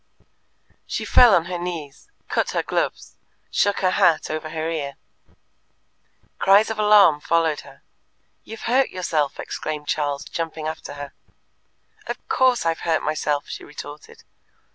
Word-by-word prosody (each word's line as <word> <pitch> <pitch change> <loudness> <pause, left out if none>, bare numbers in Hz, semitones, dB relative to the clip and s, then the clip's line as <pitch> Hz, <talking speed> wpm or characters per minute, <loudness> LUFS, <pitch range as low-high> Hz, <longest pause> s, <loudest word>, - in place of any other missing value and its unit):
She - - -3
fell 240 -5 +7
on 170 -2 +2
her 180 -1 -4
knees, 170 - -6 0.2
cut - - 0
her - - 0
gloves, - - -3 0.3
shook 205 -1 +1
her 185 -1 +3
hat 180 -6 +3
over 155 0 -4
her 160 0 -3
ear. 145 -4 -3 1.4
Cries 200 +3 +5
of 220 - -5
alarm 210 -7 +6
followed 165 -2 +1
her. - - -15 0.6
"You've 225 0 -10
hurt 260 +3 +2
yourself," 160 -6 -1
exclaimed 150 -1 -5
Charles, 145 -1 -1
jumping 160 -2 -4
after 155 -2 -6
her. 145 -1 -8 0.9
"Of - - -6
course 255 -6 +2
I've 165 0 0
hurt 165 -2 0
myself!" 150 -1 -1
she - - -7
retorted. 145 0 -11
165 Hz, 140 wpm, -23 LUFS, 150-195 Hz, 1.4 s, fell